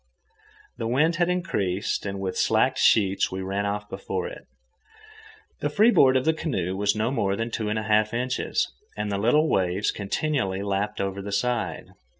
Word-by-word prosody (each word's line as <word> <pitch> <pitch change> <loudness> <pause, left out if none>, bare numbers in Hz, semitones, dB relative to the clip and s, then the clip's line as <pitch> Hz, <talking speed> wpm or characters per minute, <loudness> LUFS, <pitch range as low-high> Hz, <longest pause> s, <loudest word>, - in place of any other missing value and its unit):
The 115 - -2
wind 155 +8 +2
had 175 0 +2
increased, 100 - -1
and 100 0 -4
with 95 -1 -3
slacked - - +2
sheets 100 -3 +3
we 95 0 -4
ran 100 +2 -2
off 105 0 -3
before 450 - -4
it. - - -10 1.1
The - - -1
freeboard 200 - +5
of 130 - -1
the 160 - +4
canoe 95 - -2
was 100 +2 +1
no 110 +3 0
more 100 -7 0
than 115 +2 -3
two 110 -2 -2
and 105 - -1
a 110 - -2
half 110 0 +2
inches, 125 +2 -1 0.2
and 105 0 -2
the 100 - -1
little 150 +9 +3
waves 95 - +1
continually 100 -2 -2
lapped 100 +1 -2
over 100 0 -2
the 100 +1 -6
side. 120 +3 -1
105 Hz, 175 wpm, -25 LUFS, 100-130 Hz, 1.1 s, freeboard